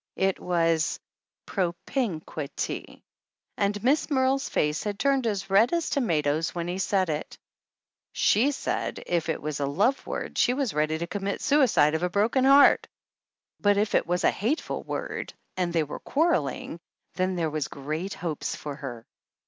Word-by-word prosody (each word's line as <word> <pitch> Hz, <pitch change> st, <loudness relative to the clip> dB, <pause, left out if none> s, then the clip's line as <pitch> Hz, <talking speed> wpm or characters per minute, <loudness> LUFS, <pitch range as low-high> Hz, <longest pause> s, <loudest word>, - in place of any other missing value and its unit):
It 190 Hz, 0 st, +1 dB
was 165 Hz, -3 st, +1 dB, 0.5 s
pro 180 Hz, -4 st, -1 dB
pm 220 Hz, -, -1 dB
qui 150 Hz, -3 st, -5 dB
ty; -, -, -4 dB, 0.5 s
and 205 Hz, +1 st, -1 dB
Miss 280 Hz, +7 st, +2 dB
Merle's 270 Hz, -1 st, +1 dB
face 150 Hz, +1 st, 0 dB
had 205 Hz, -1 st, -3 dB
turned 270 Hz, 0 st, +2 dB
as 200 Hz, -3 st, -3 dB
red 210 Hz, +5 st, +5 dB
as 340 Hz, -2 st, 0 dB
tomatoes 160 Hz, -, 0 dB
when 170 Hz, -1 st, -2 dB
he 180 Hz, +2 st, -3 dB
said 190 Hz, -1 st, +1 dB
it. 150 Hz, -1 st, -4 dB, 0.7 s
She 235 Hz, +7 st, +3 dB
said 290 Hz, -, -3 dB
if 170 Hz, -2 st, -1 dB
it 160 Hz, -, -1 dB
was 150 Hz, -1 st, -4 dB
a 140 Hz, -, 0 dB
love 205 Hz, -, +1 dB
word -, -, -4 dB
she 250 Hz, -, +3 dB
was 270 Hz, -5 st, -1 dB
ready 155 Hz, +1 st, +1 dB
to 170 Hz, -, -3 dB
commit 200 Hz, +2 st, -3 dB
suicide 255 Hz, -, +4 dB
of 160 Hz, -, 0 dB
a 180 Hz, -, +1 dB
broken 220 Hz, +8 st, +2 dB
heart, 275 Hz, +1 st, +6 dB, 0.7 s
but 205 Hz, -1 st, +3 dB
if 210 Hz, +1 st, +1 dB
it -, -, +2 dB
was 180 Hz, +1 st, 0 dB
a -, -, +5 dB
hateful 245 Hz, +11 st, -2 dB
word -, -, -5 dB, 0.2 s
and 180 Hz, -2 st, -1 dB
they 165 Hz, -2 st, +2 dB
were 150 Hz, -, -7 dB
quarreling, 185 Hz, -, 0 dB, 0.3 s
then 185 Hz, 0 st, 0 dB
there 165 Hz, -3 st, -1 dB
was 150 Hz, -2 st, -2 dB
great 155 Hz, +7 st, -4 dB
hopes 160 Hz, -3 st, -3 dB
for 145 Hz, -2 st, -6 dB
her. 120 Hz, -6 st, -7 dB
185 Hz, 175 wpm, -27 LUFS, 155-230 Hz, 0.7 s, heart